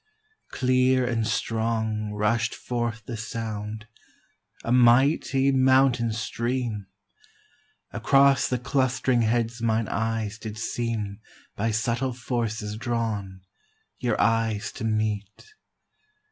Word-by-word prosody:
Clear 130 0 +2
and 115 -3 0
strong 110 -2 -1
Rush'd 110 +2 0
forth 120 -3 -3
the 120 - -5
sound, 110 -1 -5 0.8
a 115 - -2
mighty 130 +2 +4
mountain 130 -3 +4
stream; 115 -2 -3 1.0
Across 140 0 +4
the 125 - 0
clust'ring 130 0 +1
heads 115 +1 0
mine 115 -1 +1
eyes 110 -1 -2
did 110 -1 -7
seem 110 -3 -3 0.4
By 115 +3 0
subtle 115 +4 0
forces 115 -4 -3
drawn, 110 -5 -3 0.6
your 120 -3 0
eyes 115 -1 +1
to - - -8
meet. 110 - -2
115 Hz, 100 wpm, -26 LUFS, 110-125 Hz, 1.0 s, mighty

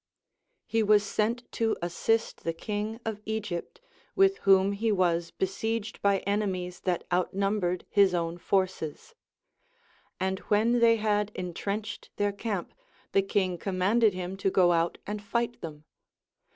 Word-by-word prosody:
He 225 0 +1
was 210 -1 +5
sent 225 +4 0
to 225 -1 0
assist 220 +6 -1
the 165 - -1
king 210 +4 -3
of 215 -2 -3
Egypt, 220 - -4 0.4
wilh 390 0 +5
whom 195 0 +5
he 215 +3 -1
Λvas 175 -4 +1
besieged 220 +3 -2
by 200 -1 +3
enemies 190 -3 -2
that 180 -2 -1
outnumbered 185 0 0
his 195 -3 +4
own 170 0 -2
forces; 185 - -1 1.1
and 190 0 -1
Λvhcn 225 +4 +3
they 230 -1 +6
had 210 -1 0
en 180 -1 -4
trenched 205 +5 -4
their 205 0 +1
camp, 200 -2 -4 0.4
the 195 - +4
king 190 -3 0
commanded 200 +3 +2
him 185 +1 -4
to 195 - +1
go 180 -2 +4
out 170 0 +1
and 210 0 -4
fight 235 +3 -2
them. 155 -3 -8
200 Hz, 140 wpm, -28 LUFS, 180-220 Hz, 1.1 s, they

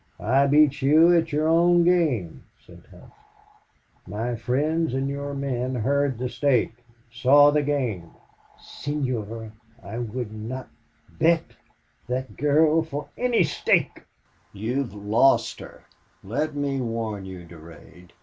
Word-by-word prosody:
"I 135 +6 +2
beat 145 0 +3
you 160 +6 +5
at 165 -1 +1
your 150 +2 0
own 170 +1 +4
game," 145 - +1 0.2
said - - -17
Hough. - - -17 0.9
"My 115 +5 -3
friends 140 +5 -1
and 135 +1 -1
your 140 0 -4
men 130 -2 -3
heard 140 +2 0
the 125 +2 -3
stake 125 -3 +1 0.4
saw 140 +4 +5
the 150 0 +2
game." 125 - -2 0.5
"Senor, 115 -7 -5 0.3
I 105 +4 -6
would 120 -1 -5
not 115 +4 -7 0.4
bet 165 - 0 0.5
that 130 +1 -4
girl 155 +2 +3
for 150 -2 -6
any 245 -5 +2
stake!" 155 - 0 0.5
"You 110 +6 -2
have 125 -7 -4
LOST 110 +6 +2
her... - - -12 0.4
Let 145 +10 -3
me 140 -2 -2
warn 115 -4 -4
you, 95 -2 -9
Durade. 85 +1 -15
135 Hz, 130 wpm, -24 LUFS, 115-150 Hz, 0.9 s, you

